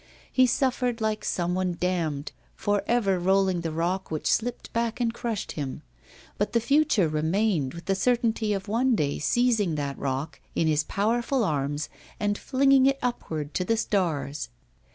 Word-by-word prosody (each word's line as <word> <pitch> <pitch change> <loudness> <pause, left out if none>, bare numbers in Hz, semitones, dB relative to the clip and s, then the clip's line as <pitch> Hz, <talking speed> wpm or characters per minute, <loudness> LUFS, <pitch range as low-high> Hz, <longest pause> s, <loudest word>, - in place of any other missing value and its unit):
He 255 -1 +5
suffered 250 -2 0
like 215 -1 -1
some 175 0 -1
one 180 -1 -1
damned, 165 -6 -1 0.2
for 205 -1 0
ever 200 -6 +2
rolling 190 -1 +2
the 165 - -2
rock 175 +4 -1
which 155 -1 -4
slipped 240 +2 -2
back 230 +1 -1
and 235 -2 +1
crushed 230 -4 -3
him; 145 0 -5 0.6
but 205 - 0
the 235 - +4
future 275 - +3
remained, 160 0 0
with 170 - -9
the 195 - +1
certainty 225 +1 +1
of 195 -1 -2
one 240 +4 +2
day 145 -7 0
seizing 220 -3 +2
that 140 -2 -3
rock 140 +3 -3
in 165 - +2
his 155 -1 +2
powerful 235 - 0
arms 145 -3 -1 0.3
and 205 0 +1
flinging 270 +2 +4
it 275 0 +2
upward 160 -11 -3
to 185 - 0
the 225 +5 +1
stars. 160 - -1
195 Hz, 165 wpm, -26 LUFS, 160-235 Hz, 0.6 s, He